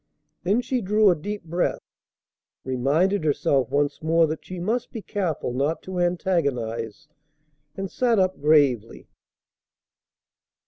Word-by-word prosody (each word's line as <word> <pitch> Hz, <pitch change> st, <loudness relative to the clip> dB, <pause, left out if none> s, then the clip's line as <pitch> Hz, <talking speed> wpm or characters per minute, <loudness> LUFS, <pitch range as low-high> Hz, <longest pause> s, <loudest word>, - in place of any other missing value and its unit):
Then 200 Hz, +7 st, +1 dB
she 250 Hz, 0 st, -1 dB
drew 210 Hz, 0 st, +4 dB
a -, -, +2 dB
deep 205 Hz, +6 st, -5 dB
breath, 170 Hz, +2 st, -1 dB, 0.9 s
reminded 150 Hz, +9 st, +1 dB
herself 140 Hz, -4 st, +1 dB
once 145 Hz, +1 st, 0 dB
more 165 Hz, +1 st, +3 dB
that 155 Hz, 0 st, -4 dB
she 185 Hz, -, -8 dB
must 220 Hz, +7 st, -2 dB
be 225 Hz, -, -7 dB
careful 170 Hz, -10 st, -2 dB
not 140 Hz, +6 st, -1 dB
to 185 Hz, -1 st, -5 dB
antagonize, 140 Hz, -, -1 dB, 0.7 s
and 195 Hz, -1 st, -5 dB
sat 240 Hz, -3 st, +2 dB
up 185 Hz, -5 st, +1 dB
gravely. 140 Hz, -7 st, +2 dB
165 Hz, 125 wpm, -24 LUFS, 140-195 Hz, 0.9 s, drew